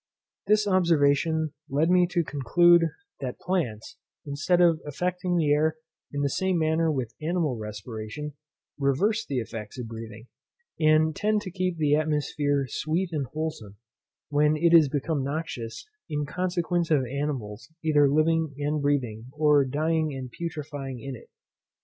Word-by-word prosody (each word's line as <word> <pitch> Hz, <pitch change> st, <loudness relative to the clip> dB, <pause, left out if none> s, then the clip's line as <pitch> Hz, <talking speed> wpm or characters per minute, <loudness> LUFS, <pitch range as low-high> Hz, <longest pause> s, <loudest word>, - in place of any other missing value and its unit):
This 210 Hz, +1 st, +4 dB
observation 160 Hz, -3 st, +2 dB, 0.2 s
led 150 Hz, +5 st, +2 dB
me 180 Hz, -1 st, +5 dB
to 175 Hz, -1 st, +1 dB
conclude, 170 Hz, +5 st, +4 dB, 0.3 s
that 130 Hz, -3 st, -4 dB
plants, 140 Hz, -, -3 dB, 0.3 s
instead 155 Hz, +5 st, +1 dB
of 170 Hz, -3 st, +4 dB
affecting 180 Hz, +4 st, -2 dB
the 155 Hz, -3 st, +2 dB
air 155 Hz, +1 st, +2 dB, 0.4 s
in 145 Hz, 0 st, -2 dB
the -, -, +3 dB
same 190 Hz, +5 st, 0 dB
manner 160 Hz, 0 st, +2 dB
with 130 Hz, -6 st, -3 dB
animal 160 Hz, -4 st, 0 dB
respiration, 110 Hz, +6 st, -6 dB, 0.5 s
reverse 195 Hz, +12 st, +1 dB
the 135 Hz, -, -3 dB
effects 115 Hz, -1 st, -5 dB
of 125 Hz, -2 st, -5 dB
breathing, 110 Hz, 0 st, -9 dB, 0.5 s
and 155 Hz, 0 st, +4 dB
tend 210 Hz, 0 st, +1 dB
to 190 Hz, -3 st, -7 dB
keep 185 Hz, -1 st, -2 dB
the 150 Hz, -2 st, +2 dB
atmosphere 150 Hz, -2 st, +1 dB
sweet 165 Hz, +8 st, -1 dB
and 145 Hz, -5 st, -2 dB
wholesome, 155 Hz, -10 st, -5 dB, 0.5 s
when 150 Hz, +1 st, +3 dB
it 170 Hz, +2 st, +3 dB
is 160 Hz, -4 st, +7 dB
become 145 Hz, 0 st, -1 dB
noxious, 140 Hz, -, -5 dB, 0.2 s
in 150 Hz, -1 st, -1 dB
consequence 175 Hz, +1 st, -1 dB
of 145 Hz, -5 st, +3 dB
animals 135 Hz, -3 st, -4 dB
either 145 Hz, -3 st, +4 dB
living 155 Hz, 0 st, +2 dB
and 145 Hz, +1 st, -1 dB
breathing, 125 Hz, -6 st, -1 dB
or 150 Hz, -2 st, +4 dB
dying 155 Hz, +2 st, 0 dB
and 130 Hz, -2 st, -6 dB
putrefying 145 Hz, -5 st, -5 dB
in 135 Hz, +2 st, -6 dB
it. -, -, -15 dB
150 Hz, 145 wpm, -26 LUFS, 135-165 Hz, 0.5 s, is